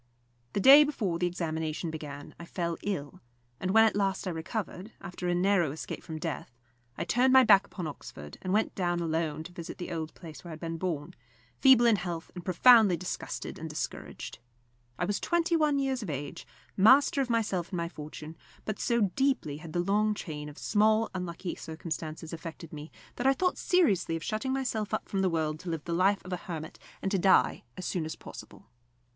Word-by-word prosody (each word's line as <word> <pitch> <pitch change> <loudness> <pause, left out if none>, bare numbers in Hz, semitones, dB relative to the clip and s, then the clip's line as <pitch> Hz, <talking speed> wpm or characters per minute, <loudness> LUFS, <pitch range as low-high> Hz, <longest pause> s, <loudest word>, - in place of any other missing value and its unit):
The - - 0
day 275 +8 +9
before 210 - -1
the 180 - +2
examination 160 -2 -3
began 145 -2 -8
I 170 - -8
fell 170 -1 -2
ill; 150 -8 -4 0.4
and 185 - -2
when 225 +3 +6
at 220 - +2
last 195 -1 0
I - - 0
recovered, 185 +4 -5
after 180 0 -6
a 175 - +2
narrow 180 -4 +2
escape 155 - -6
from 160 -2 -7
death, 155 -3 -4 0.5
I 170 - -1
turned 245 +8 +3
my 260 0 +9
back 200 -4 +6
upon 180 - -6
Oxford, 75 - -9
and 185 - -3
went 215 +3 +2
down 175 -2 0
alone 160 -2 -1
to 175 - -10
visit 170 0 -8
the 175 - -6
old 160 -2 -4
place 160 -3 -11
where 175 - -9
I - - -6
had 155 - -9
been 165 0 -4
born, 160 -5 -3 0.5
feeble 260 -3 +7
in 230 -3 +5
health 175 -2 -5
and 180 - -8
profoundly 200 +1 +6
disgusted 180 +2 -5
and - - -5
discouraged. - - -6 0.6
I 180 - 0
was 205 +2 -1
twenty 345 0 +1
one 305 -3 +3
years 270 -2 0
of 205 - -5
age, 145 -1 -5 0.3
master 265 +7 +6
of 260 - -2
myself 205 -7 0
and - - -6
of - - 0
my - - -3
fortune; 155 -1 -9 0.3
but 215 - -3
so 235 -1 +1
deeply 265 - +1
had 155 +1 -9
the 175 - -1
long 210 +4 +2
chain 150 -6 -6
of 145 - -13
small 220 +1 +2
unlucky 180 -1 -4
circumstances 160 0 -6
affected 165 0 -8
me, 150 +1 -7 0.3
that 250 - +1
I 270 - +6
thought 365 +5 0
seriously 205 - +2
of 165 - -5
shutting 220 +5 -2
myself 230 -6 -1
up - - -5
from 195 - -1
the 190 - +3
world 155 -2 -1
to 180 - -7
live 165 -3 -3
the 170 - -3
life 195 +3 +2
of 185 - -5
a - - -1
hermit, 160 -3 -7 0.2
and 195 - 0
to 195 - +2
die 190 +1 +3
as 185 - -5
soon 175 - -1
as 160 - -5
possible. - - -11
180 Hz, 210 wpm, -29 LUFS, 160-215 Hz, 0.6 s, day